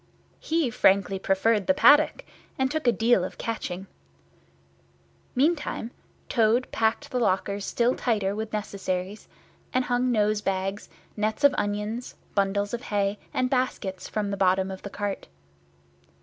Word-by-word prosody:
He 320 Hz, -6 st, 0 dB
frankly 195 Hz, -2 st, +3 dB
preferred 195 Hz, +2 st, +1 dB
the 280 Hz, -, +4 dB
paddock, 300 Hz, +11 st, +5 dB, 0.3 s
and 265 Hz, 0 st, +1 dB
took 310 Hz, -3 st, -2 dB
a -, -, +7 dB
deal 230 Hz, -4 st, +3 dB
of -, -, -6 dB
catching. 195 Hz, -5 st, -4 dB, 1.5 s
Meantime 295 Hz, -4 st, 0 dB, 0.4 s
Toad 230 Hz, +2 st, +2 dB
packed 225 Hz, +6 st, 0 dB
the 250 Hz, -, 0 dB
lockers 200 Hz, -2 st, 0 dB
still 240 Hz, +1 st, +1 dB
tighter 205 Hz, -5 st, 0 dB
with 220 Hz, 0 st, -4 dB
necessaries, 195 Hz, -1 st, -4 dB, 0.4 s
and 255 Hz, 0 st, +1 dB
hung 245 Hz, +1 st, +1 dB
nosebags, 205 Hz, -3 st, 0 dB, 0.3 s
nets 215 Hz, +3 st, -2 dB
of 285 Hz, -, +7 dB
onions, 210 Hz, +4 st, -3 dB, 0.2 s
bundles 200 Hz, +1 st, 0 dB
of 240 Hz, -, -2 dB
hay, 205 Hz, -2 st, -1 dB
and 255 Hz, 0 st, 0 dB
baskets 205 Hz, -8 st, -2 dB
from 205 Hz, -2 st, -2 dB
the 200 Hz, -, -2 dB
bottom 190 Hz, 0 st, +2 dB
of 190 Hz, -, -7 dB
the 200 Hz, -, -7 dB
cart. 200 Hz, -1 st, -4 dB
215 Hz, 135 wpm, -26 LUFS, 195-245 Hz, 1.5 s, a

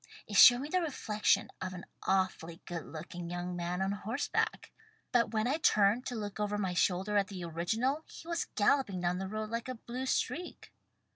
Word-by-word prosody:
It 205 Hz, -, -7 dB
showed 245 Hz, +4 st, +9 dB
me 285 Hz, -, -4 dB
the 365 Hz, +2 st, +1 dB
reflection 220 Hz, -9 st, +1 dB
of 185 Hz, 0 st, -3 dB
an 180 Hz, -, -8 dB, 0.2 s
awfully 175 Hz, -3 st, 0 dB
good 170 Hz, -2 st, -5 dB
looking 170 Hz, +2 st, -7 dB
young 175 Hz, +1 st, -4 dB
man 175 Hz, +2 st, -2 dB
on 195 Hz, -, 0 dB
horse 220 Hz, +7 st, -3 dB
back. -, -, -1 dB, 0.4 s
But 235 Hz, -3 st, +3 dB
when 220 Hz, +1 st, 0 dB
I 280 Hz, +5 st, +1 dB
turned 215 Hz, -4 st, +3 dB
to 245 Hz, -, -3 dB
look 205 Hz, -2 st, -5 dB
over 210 Hz, 0 st, 0 dB
my 190 Hz, -3 st, -1 dB
shoulder 190 Hz, +3 st, +1 dB
at 200 Hz, -1 st, +2 dB
the 185 Hz, -3 st, -6 dB
original 220 Hz, -, -1 dB
he 330 Hz, -, -11 dB
was 340 Hz, 0 st, -1 dB
galloping 205 Hz, -4 st, +2 dB
down 180 Hz, +1 st, 0 dB
the 190 Hz, -, -3 dB
road 215 Hz, +2 st, -4 dB
like 230 Hz, +2 st, -3 dB
a 255 Hz, -, -4 dB
blue 245 Hz, +3 st, -5 dB
streak." 300 Hz, +8 st, -2 dB
205 Hz, 200 wpm, -32 LUFS, 180-245 Hz, 0.4 s, showed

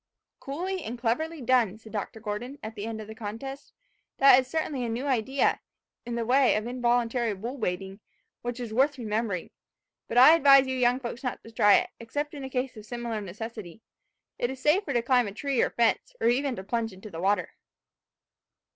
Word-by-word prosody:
"Coolly 360 Hz, +6 st, -4 dB
and 235 Hz, +3 st, -5 dB
cleverly 280 Hz, +7 st, -1 dB
done!" 235 Hz, -5 st, +2 dB
said 220 Hz, 0 st, -14 dB
Dr. 220 Hz, +1 st, -4 dB
Gordon, 230 Hz, +5 st, -5 dB
at 220 Hz, +1 st, -6 dB
the 210 Hz, 0 st, -6 dB
end 225 Hz, -1 st, -5 dB
of 215 Hz, -, -8 dB
the 220 Hz, -, -8 dB
contest. 230 Hz, +6 st, -7 dB, 0.5 s
"That 270 Hz, -2 st, +8 dB
is 260 Hz, -, -3 dB
certainly 300 Hz, -4 st, -2 dB
a 235 Hz, -, -2 dB
new 235 Hz, +4 st, -3 dB
idea, 265 Hz, 0 st, +1 dB, 0.5 s
in 240 Hz, -, -3 dB
the 235 Hz, -1 st, -1 dB
way 260 Hz, +2 st, +4 dB
of 215 Hz, +1 st, -1 dB
involuntary 240 Hz, -2 st, 0 dB
bull 240 Hz, +8 st, -6 dB
baiting, 190 Hz, 0 st, -3 dB, 0.4 s
which 245 Hz, 0 st, -4 dB
is 235 Hz, -3 st, -5 dB
worth 275 Hz, +5 st, +2 dB
remembering. 215 Hz, -5 st, -2 dB, 0.6 s
But 230 Hz, -, -3 dB
I 260 Hz, +6 st, +9 dB
advise 275 Hz, -4 st, +7 dB
you 260 Hz, 0 st, -2 dB
young 250 Hz, 0 st, +2 dB
folks 240 Hz, +1 st, -6 dB
not 250 Hz, -, -4 dB
to 225 Hz, -, -12 dB
try 205 Hz, -2 st, +5 dB
it, -, -, +1 dB
except 290 Hz, +6 st, -4 dB
in 275 Hz, -3 st, -6 dB
case 255 Hz, -1 st, -2 dB
of 215 Hz, -, -9 dB
a -, -, -16 dB
similar 235 Hz, -1 st, -4 dB
necessity. 215 Hz, 0 st, -8 dB, 0.6 s
It 240 Hz, -, 0 dB
is 265 Hz, 0 st, -6 dB
safer 300 Hz, +6 st, +2 dB
to 240 Hz, -3 st, +1 dB
climb 245 Hz, -2 st, +3 dB
a 200 Hz, -, -6 dB
tree 275 Hz, +2 st, 0 dB
or -, -, +2 dB
fence, 235 Hz, -1 st, 0 dB
or 225 Hz, -, +2 dB
even 265 Hz, +1 st, +1 dB
to 190 Hz, -, -7 dB
plunge 225 Hz, +2 st, -2 dB
into 195 Hz, +3 st, -11 dB
the 165 Hz, -, -6 dB
water." 200 Hz, +2 st, +1 dB
240 Hz, 200 wpm, -27 LUFS, 220-265 Hz, 0.6 s, I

